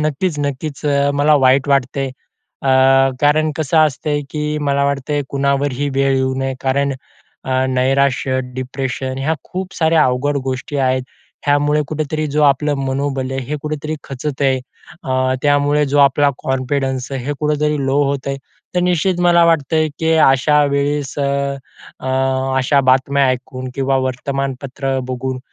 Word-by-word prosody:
नक्कीच-नक्कीच. 150 Hz, -2 st, -2 dB
अ, 140 Hz, 0 st, +2 dB
मला 150 Hz, +1 st, +5 dB
वाईट 135 Hz, +2 st, +4 dB
वाटते. 135 Hz, 0 st, +1 dB, 0.6 s
अ, 135 Hz, -, +1 dB, 0.5 s
कारण 155 Hz, +2 st, +3 dB
कसं 155 Hz, 0 st, +1 dB
असते, 150 Hz, -1 st, +1 dB
की 150 Hz, 0 st, -2 dB
मला 140 Hz, 0 st, +2 dB
वाटत 140 Hz, 0 st, -2 dB, 0.2 s
कुणावरही 140 Hz, 0 st, 0 dB
वेळ 135 Hz, 0 st, +2 dB
येऊ 130 Hz, 0 st, 0 dB
नये. 135 Hz, 0 st, -2 dB
कारण 140 Hz, +1 st, 0 dB, 0.5 s
अ, -, -, -5 dB, 0.2 s
नैराश्य, 130 Hz, 0 st, +1 dB, 0.2 s
डिप्रेशन 130 Hz, 0 st, -4 dB
ह्या 155 Hz, +4 st, 0 dB
खूप 185 Hz, +1 st, -6 dB
साऱ्या 160 Hz, -1 st, +3 dB
अवघड 130 Hz, +3 st, 0 dB
गोष्टी 130 Hz, +2 st, -3 dB
आहेत. 130 Hz, -1 st, +1 dB, 0.4 s
ह्यामुळे 145 Hz, +1 st, +2 dB
कुठेतरी 155 Hz, 0 st, -2 dB
जो 150 Hz, -, +2 dB
आपलं 145 Hz, +1 st, +3 dB
मनोबल 135 Hz, -1 st, -2 dB
आहे, 135 Hz, 0 st, -2 dB
हे 150 Hz, -, -3 dB
कुठेतरी 155 Hz, 0 st, -3 dB
खचत 140 Hz, +1 st, -5 dB
आहे. 135 Hz, -1 st, +2 dB, 0.4 s
अ, 130 Hz, 0 st, 0 dB
त्यामुळे 145 Hz, +1 st, +3 dB
जो 145 Hz, -, +3 dB
आपला 140 Hz, +1 st, +4 dB
कॉन्फिडन्स 130 Hz, 0 st, -2 dB
आहे 130 Hz, -2 st, -4 dB
हे 145 Hz, -, -1 dB
कुठेतरी 150 Hz, 0 st, 0 dB
लो 135 Hz, +1 st, +1 dB
होत 140 Hz, -1 st, -2 dB
आहे. 135 Hz, 0 st, -2 dB, 0.4 s
तर 180 Hz, -, +2 dB
निश्चित 180 Hz, 0 st, +1 dB
मला 170 Hz, -1 st, +5 dB
वाटतंय 160 Hz, -1 st, +2 dB
की 160 Hz, 0 st, +1 dB
अशा 150 Hz, 0 st, +4 dB
वेळेस 140 Hz, -1 st, -1 dB
अ, 140 Hz, 0 st, -1 dB, 1.0 s
अशा 135 Hz, +2 st, +3 dB
बातम्या 135 Hz, +2 st, +2 dB
ऐकून 130 Hz, 0 st, -3 dB
किंवा 135 Hz, 0 st, +1 dB
वर्तमानपत्र 135 Hz, +1 st, -3 dB
बघून 130 Hz, 0 st, -3 dB
140 Hz, 145 wpm, -18 LUFS, 130-150 Hz, 1.0 s, मला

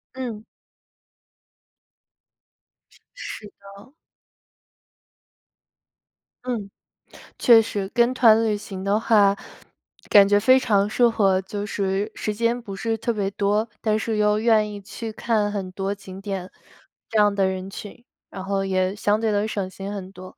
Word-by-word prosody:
嗯。 235 Hz, -5 st, -5 dB, 2.7 s
是 215 Hz, -, -7 dB
的。 200 Hz, +6 st, -15 dB, 2.5 s
嗯， 225 Hz, -6 st, -4 dB, 0.7 s
确 230 Hz, -2 st, +7 dB
实， 205 Hz, -3 st, -3 dB
跟 240 Hz, +1 st, +3 dB
团 225 Hz, -3 st, +5 dB
旅 215 Hz, -2 st, 0 dB
行 195 Hz, -2 st, -8 dB
的 200 Hz, +2 st, +1 dB
话， 205 Hz, -3 st, +4 dB, 0.7 s
感 200 Hz, -1 st, +7 dB
觉 205 Hz, 0 st, +4 dB
非 255 Hz, +5 st, +5 dB
常 205 Hz, -5 st, +1 dB
适 240 Hz, +2 st, +3 dB
合， 195 Hz, -4 st, +2 dB
就 205 Hz, +2 st, -5 dB
是 200 Hz, +2 st, -2 dB
时 215 Hz, -, -3 dB
间 235 Hz, +3 st, 0 dB
不 200 Hz, -4 st, -8 dB
是 225 Hz, +3 st, -2 dB
特 235 Hz, +2 st, -1 dB
别 200 Hz, -3 st, -1 dB
多， 210 Hz, +3 st, 0 dB
但 215 Hz, -1 st, +1 dB
是 220 Hz, -1 st, -2 dB
又 210 Hz, 0 st, +2 dB
愿 215 Hz, -2 st, +3 dB
意 200 Hz, -, -8 dB
去 220 Hz, +3 st, -7 dB
看 215 Hz, -2 st, 0 dB
很 195 Hz, -3 st, -4 dB
多 195 Hz, +2 st, -3 dB
景 190 Hz, -1 st, -11 dB
点， 195 Hz, -2 st, -5 dB, 0.6 s
这 220 Hz, -, +1 dB
样 205 Hz, -1 st, +4 dB
的 195 Hz, -1 st, +2 dB
人 190 Hz, 0 st, -4 dB
群， 205 Hz, +4 st, -10 dB, 0.3 s
然 190 Hz, -, -7 dB
后 195 Hz, 0 st, -1 dB
也 185 Hz, 0 st, 0 dB
相 210 Hz, +1 st, +1 dB
对 220 Hz, -1 st, +1 dB
能 205 Hz, +1 st, 0 dB
省 200 Hz, -3 st, -3 dB
心 195 Hz, +2 st, -7 dB
很 190 Hz, -2 st, -7 dB
多， 185 Hz, -1 st, -12 dB
205 Hz, 155 characters per minute, -23 LUFS, 195-220 Hz, 2.7 s, 确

